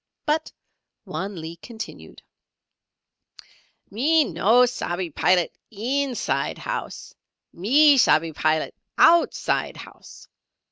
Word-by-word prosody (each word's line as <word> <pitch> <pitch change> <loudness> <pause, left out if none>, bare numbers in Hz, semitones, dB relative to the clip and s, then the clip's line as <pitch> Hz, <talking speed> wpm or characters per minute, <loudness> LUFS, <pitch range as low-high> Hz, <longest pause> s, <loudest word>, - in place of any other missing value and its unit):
But 310 +1 -1 0.5
Wan 195 -2 -5
Lee 160 +1 -8
continued: 225 +5 -10 1.7
"Me 300 +9 +3
no 225 - +3
shabbee 180 -8 -4
Pilat 180 +3 +2 0.2
inside 250 +4 -2
housee; - - -6 0.4
me 275 - +4
shabbee 160 -7 +3
Pilat 155 +1 0 0.2
outside 335 +1 +3
housee. - - -13
220 Hz, 85 wpm, -23 LUFS, 175-280 Hz, 1.7 s, me